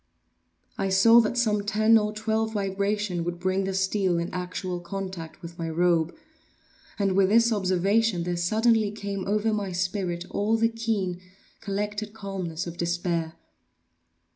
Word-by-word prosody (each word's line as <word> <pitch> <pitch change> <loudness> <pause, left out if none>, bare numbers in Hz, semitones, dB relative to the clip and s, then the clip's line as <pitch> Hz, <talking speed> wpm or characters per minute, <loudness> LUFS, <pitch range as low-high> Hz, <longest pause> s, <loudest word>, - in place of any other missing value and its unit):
I 195 - 0
saw 225 +5 +7
that 230 +2 -2
some 215 -4 +2
ten 215 +2 +3
or 210 -1 +3
twelve 220 +1 -1
vibrations 200 -2 -1
would 175 +1 -4
bring 185 +1 0
the 190 - -2
steel 190 -2 +1
in 170 +1 -3
actual 180 0 -4
contact 175 -2 -7
with 170 0 -9
my 165 -1 -2
robe, 170 0 +1 0.8
and 200 -2 +1
with 190 0 +3
this 230 +2 +4
observation 195 0 +1
there 175 0 -2
suddenly 215 +5 +2
came 200 -2 -5
over 215 +2 +1
my 205 -3 -2
spirit 180 -1 -2
all 215 +2 +1
the 230 0 +3
keen, 215 -6 -2 0.4
collected 210 +1 -3
calmness 185 -5 -4
of 170 0 -7
despair. 170 -1 -1
195 Hz, 145 wpm, -26 LUFS, 175-215 Hz, 0.8 s, saw